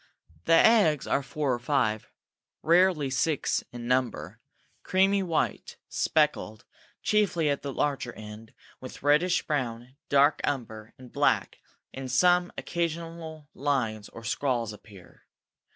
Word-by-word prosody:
The -, -, +3 dB
eggs 165 Hz, -, +5 dB
are -, -, +1 dB
four 140 Hz, -1 st, -2 dB
or 120 Hz, -, -2 dB
five, 120 Hz, -5 st, 0 dB, 0.5 s
rarely 170 Hz, -4 st, +3 dB
six 140 Hz, +3 st, 0 dB
in 120 Hz, -1 st, -7 dB
number, 115 Hz, -7 st, -1 dB, 0.4 s
creamy 195 Hz, +1 st, +2 dB
white, 170 Hz, -4 st, -2 dB
speckled, 150 Hz, -8 st, 0 dB, 0.4 s
chiefly 180 Hz, -8 st, +2 dB
at 140 Hz, -, -2 dB
the 140 Hz, -, -5 dB
larger 135 Hz, -2 st, -1 dB
end, 110 Hz, +1 st, -11 dB, 0.2 s
with 130 Hz, 0 st, -10 dB
reddish 155 Hz, +5 st, +3 dB
brown, 125 Hz, -3 st, -3 dB
dark 140 Hz, +2 st, +4 dB
umber, 110 Hz, -5 st, -4 dB
and 130 Hz, -1 st, -14 dB
black; -, -, +1 dB, 0.3 s
in 130 Hz, -1 st, -6 dB
some, 175 Hz, +7 st, +3 dB
occasional 165 Hz, -2 st, -4 dB
lines 120 Hz, -7 st, -2 dB
or 115 Hz, -, -12 dB
scrawls 120 Hz, -2 st, -1 dB
appear. 100 Hz, -3 st, -16 dB
140 Hz, 120 wpm, -27 LUFS, 120-165 Hz, 0.5 s, eggs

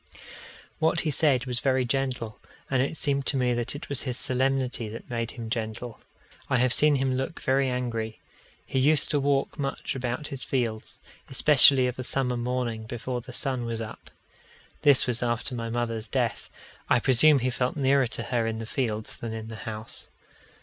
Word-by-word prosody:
What 160 Hz, +1 st, +2 dB
he 155 Hz, -, -1 dB
said 140 Hz, -3 st, +2 dB
was 125 Hz, -2 st, -2 dB
very 130 Hz, -1 st, +1 dB
gentle, 125 Hz, -3 st, -2 dB, 0.3 s
and 130 Hz, -2 st, +3 dB
it 140 Hz, +4 st, -2 dB
seemed 140 Hz, -2 st, 0 dB
to 140 Hz, -, +3 dB
me 125 Hz, -1 st, +2 dB
it 125 Hz, +7 st, -3 dB
was 140 Hz, -3 st, -1 dB
his 125 Hz, -3 st, -3 dB
solemnity 130 Hz, -3 st, 0 dB
that 115 Hz, +3 st, -9 dB
made 115 Hz, -1 st, -2 dB
him 115 Hz, -3 st, -7 dB
gentle. 115 Hz, +1 st, -4 dB, 0.5 s
I -, -, +3 dB
have 125 Hz, 0 st, +3 dB
seen 150 Hz, -1 st, +4 dB
him 135 Hz, -1 st, +1 dB
look 135 Hz, +5 st, -3 dB
very 135 Hz, 0 st, +1 dB
angry. 115 Hz, -3 st, -3 dB, 0.5 s
He 130 Hz, -, -1 dB
used 150 Hz, +3 st, +3 dB
to 145 Hz, -, +2 dB
walk 140 Hz, +2 st, 0 dB
much 140 Hz, -1 st, -3 dB
about 130 Hz, +3 st, -3 dB
his 135 Hz, -2 st, -6 dB
fields, 115 Hz, -4 st, -2 dB, 0.3 s
especially 135 Hz, -1 st, +7 dB
of 125 Hz, 0 st, -3 dB
a -, -, -2 dB
summer 125 Hz, -1 st, -1 dB
morning 120 Hz, -2 st, -2 dB
before 120 Hz, +2 st, -4 dB
the 125 Hz, -, -11 dB
sun 130 Hz, 0 st, -1 dB
was 115 Hz, -1 st, -3 dB
up. 110 Hz, -1 st, -8 dB, 0.7 s
This 145 Hz, -3 st, +5 dB
was 120 Hz, -2 st, 0 dB
after 120 Hz, +2 st, -1 dB
my 115 Hz, -1 st, -4 dB
mother's 115 Hz, -1 st, -2 dB
death. -, -, -1 dB, 0.4 s
I 125 Hz, -, +5 dB
presume 135 Hz, +5 st, +6 dB
he 130 Hz, 0 st, 0 dB
felt 125 Hz, 0 st, -1 dB
nearer 135 Hz, -1 st, +3 dB
to 115 Hz, 0 st, -4 dB
her 120 Hz, -1 st, 0 dB
in 110 Hz, 0 st, -2 dB
the 115 Hz, -, -5 dB
fields 110 Hz, -3 st, -3 dB
than 115 Hz, -1 st, -5 dB
in 110 Hz, 0 st, -6 dB
the 110 Hz, -, -7 dB
house. 110 Hz, +1 st, -8 dB
125 Hz, 185 wpm, -27 LUFS, 115-135 Hz, 0.7 s, especially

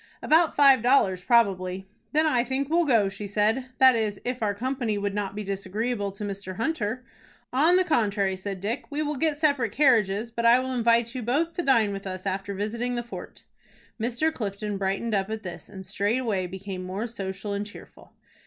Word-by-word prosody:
"About 320 Hz, +1 st, +4 dB
five 275 Hz, -4 st, +6 dB
dollars 205 Hz, -8 st, +3 dB
probably." 190 Hz, -5 st, +2 dB, 0.2 s
"Then 310 Hz, +1 st, +3 dB
I 250 Hz, -6 st, +2 dB
think 265 Hz, +3 st, -2 dB
we'll 340 Hz, +1 st, +3 dB
go," 225 Hz, -7 st, +4 dB
she 200 Hz, +1 st, -6 dB
said, 215 Hz, +6 st, +1 dB
"that 260 Hz, -2 st, +7 dB
is, 215 Hz, -3 st, -1 dB
if 250 Hz, 0 st, -3 dB
our 205 Hz, -2 st, 0 dB
company 245 Hz, -2 st, -2 dB
would 200 Hz, 0 st, -2 dB
not 200 Hz, -1 st, -3 dB
be 210 Hz, -, -4 dB
disagreeable 200 Hz, +2 st, -3 dB
to 200 Hz, -, -7 dB
Mr. 195 Hz, -2 st, -5 dB
Hunter." 235 Hz, -, -2 dB, 0.5 s
"On 310 Hz, +7 st, +4 dB
the 370 Hz, -, +4 dB
contrary," 205 Hz, -, +1 dB
said 190 Hz, 0 st, -6 dB
Dick. 225 Hz, +6 st, -3 dB
"We 300 Hz, +1 st, -2 dB
will 300 Hz, 0 st, -2 dB
get 300 Hz, +1 st, 0 dB
separate 285 Hz, -8 st, +1 dB
carriages, 230 Hz, -6 st, +3 dB
but 235 Hz, 0 st, -3 dB
I 235 Hz, +1 st, +7 dB
will 260 Hz, 0 st, -2 dB
invite 235 Hz, -1 st, +2 dB
you 255 Hz, -, -4 dB
both 290 Hz, +9 st, 0 dB
to 350 Hz, -, -2 dB
dine 230 Hz, -9 st, +3 dB
with 195 Hz, 0 st, -6 dB
us 185 Hz, 0 st, -6 dB
after 195 Hz, +1 st, -3 dB
visiting 230 Hz, +5 st, -2 dB
the 240 Hz, -, -2 dB
fort." 235 Hz, -, -10 dB, 0.6 s
Mr. 250 Hz, +8 st, 0 dB
Clifton 205 Hz, -3 st, -4 dB
brightened 195 Hz, +4 st, -1 dB
up 195 Hz, 0 st, 0 dB
at 220 Hz, 0 st, -4 dB
this, 175 Hz, -3 st, -8 dB
and 190 Hz, -1 st, -10 dB
straightway 205 Hz, 0 st, -1 dB
became 190 Hz, 0 st, -6 dB
more 190 Hz, +5 st, -4 dB
social 200 Hz, -3 st, -5 dB
and 200 Hz, 0 st, -2 dB
cheerful. 205 Hz, -, -13 dB
220 Hz, 195 wpm, -26 LUFS, 200-255 Hz, 0.6 s, that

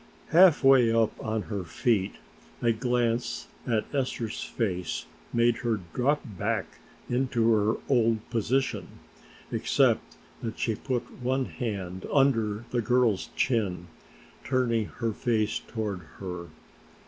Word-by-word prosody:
Halfway 135 Hz, -9 st, +6 dB
up 115 Hz, -1 st, +3 dB
on 110 Hz, -1 st, -1 dB
her 100 Hz, -4 st, -4 dB
feet 95 Hz, +4 st, 0 dB, 0.4 s
a 115 Hz, -, +3 dB
glance 120 Hz, 0 st, 0 dB, 0.2 s
at 110 Hz, -3 st, +1 dB
Esther's 125 Hz, -5 st, -2 dB
face 90 Hz, -7 st, -2 dB, 0.3 s
made 120 Hz, 0 st, +3 dB
her 115 Hz, -3 st, -1 dB
drop 145 Hz, +4 st, +1 dB
back 105 Hz, -8 st, -3 dB, 0.3 s
into 125 Hz, -2 st, +2 dB
her 105 Hz, 0 st, +2 dB
old 115 Hz, -4 st, +2 dB
position, 130 Hz, +4 st, 0 dB, 0.6 s
except -, -, +2 dB, 0.2 s
that 110 Hz, -1 st, -4 dB
she 115 Hz, -, 0 dB
put 125 Hz, +2 st, -4 dB
one 130 Hz, +2 st, +1 dB
hand 95 Hz, -7 st, -4 dB
under 115 Hz, -6 st, +2 dB
the 120 Hz, -, +1 dB
girl's 120 Hz, -3 st, +2 dB
chin, 100 Hz, -9 st, 0 dB, 0.5 s
turning 120 Hz, -4 st, +1 dB
her 115 Hz, -2 st, -3 dB
face 110 Hz, -2 st, 0 dB
toward 105 Hz, -5 st, -4 dB, 0.2 s
her. 90 Hz, -3 st, -6 dB
115 Hz, 115 wpm, -28 LUFS, 105-125 Hz, 0.6 s, Halfway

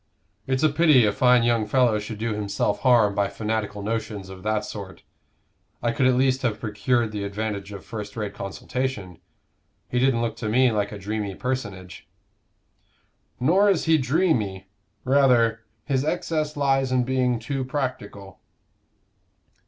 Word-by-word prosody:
"It's 130 Hz, +1 st, 0 dB
a 155 Hz, -, +5 dB
pity 150 Hz, -5 st, +5 dB
a 105 Hz, -, +3 dB
fine 125 Hz, +2 st, +4 dB
young 115 Hz, -2 st, +1 dB
fellow 120 Hz, -2 st, +3 dB
should 105 Hz, +1 st, -6 dB
do 115 Hz, +1 st, -2 dB
himself 100 Hz, 0 st, -1 dB
harm 120 Hz, -6 st, +4 dB
by 100 Hz, 0 st, +1 dB
fanatical 105 Hz, -2 st, -3 dB
notions 105 Hz, -3 st, -4 dB
of 95 Hz, -1 st, -10 dB
that 105 Hz, +1 st, -1 dB
sort. 100 Hz, -3 st, -8 dB, 0.8 s
I 120 Hz, -, +2 dB
could 130 Hz, +2 st, +2 dB
at 130 Hz, -, +3 dB
least 130 Hz, 0 st, +2 dB
have 115 Hz, -5 st, -1 dB
procured 115 Hz, +2 st, 0 dB
the 105 Hz, -1 st, -4 dB
advantage 100 Hz, 0 st, -4 dB
of 100 Hz, -2 st, -9 dB
first 105 Hz, -2 st, -7 dB
rate 105 Hz, -2 st, -3 dB
consultation. 100 Hz, -2 st, -4 dB, 0.7 s
He 125 Hz, -, -1 dB
didn't 125 Hz, -2 st, +2 dB
look 115 Hz, -1 st, -2 dB
to 110 Hz, -2 st, -3 dB
me 125 Hz, +2 st, +4 dB
like 105 Hz, -2 st, -1 dB
a 105 Hz, -, -6 dB
dreamy 100 Hz, 0 st, -4 dB
personage." 105 Hz, -8 st, -5 dB, 1.3 s
"Nor 185 Hz, +11 st, +4 dB
is 190 Hz, -5 st, +1 dB
he 160 Hz, -1 st, +4 dB
dreamy; 125 Hz, -, 0 dB, 0.4 s
rather, 125 Hz, -4 st, +4 dB, 0.3 s
his 135 Hz, -3 st, 0 dB
excess 155 Hz, -1 st, -2 dB
lies 135 Hz, -2 st, +1 dB
in 130 Hz, -1 st, +2 dB
being 125 Hz, -1 st, +1 dB
too 135 Hz, +4 st, -3 dB
practical." 115 Hz, -8 st, -5 dB
115 Hz, 150 wpm, -24 LUFS, 105-130 Hz, 1.3 s, a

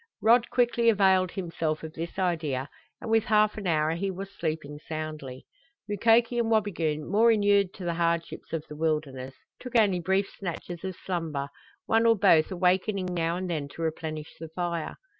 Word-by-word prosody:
Rod 235 Hz, +2 st, +4 dB
quickly 240 Hz, -1 st, +3 dB
availed 190 Hz, -3 st, +4 dB
himself 165 Hz, -4 st, -3 dB
of 160 Hz, 0 st, -7 dB
this 165 Hz, +3 st, -6 dB
idea, 155 Hz, -7 st, -1 dB, 0.3 s
and 225 Hz, -, -5 dB
within 225 Hz, -1 st, +3 dB
half 215 Hz, -1 st, +3 dB
an 205 Hz, -3 st, -5 dB
hour 155 Hz, -2 st, +2 dB
he 185 Hz, +4 st, -2 dB
was 195 Hz, +1 st, -6 dB
sleeping 155 Hz, -3 st, -4 dB
soundly. 155 Hz, -5 st, -6 dB, 0.4 s
Mukoki 230 Hz, +3 st, +3 dB
and 230 Hz, -1 st, +1 dB
Wabigoon, 170 Hz, -9 st, 0 dB
more 220 Hz, +5 st, +4 dB
inured 205 Hz, -3 st, +3 dB
to 190 Hz, -, -8 dB
the 170 Hz, -, 0 dB
hardships 170 Hz, 0 st, -2 dB
of 160 Hz, -2 st, -3 dB
the 150 Hz, -, -9 dB
wilderness, 145 Hz, -4 st, -2 dB, 0.2 s
took 250 Hz, -1 st, -9 dB
only 200 Hz, -5 st, +3 dB
brief 190 Hz, +3 st, +1 dB
snatches 175 Hz, -2 st, -7 dB
of 190 Hz, -1 st, -4 dB
slumber, 160 Hz, -7 st, -3 dB, 0.4 s
one 225 Hz, +1 st, +3 dB
or 230 Hz, -, +6 dB
both 160 Hz, -4 st, +5 dB
awakening 185 Hz, +1 st, +1 dB
now 170 Hz, 0 st, 0 dB
and 185 Hz, 0 st, -3 dB
then 155 Hz, -5 st, -2 dB
to 165 Hz, +3 st, -7 dB
replenish 155 Hz, -1 st, -4 dB
the 165 Hz, 0 st, -7 dB
fire. 170 Hz, -1 st, -3 dB
175 Hz, 175 wpm, -27 LUFS, 155-205 Hz, 0.4 s, or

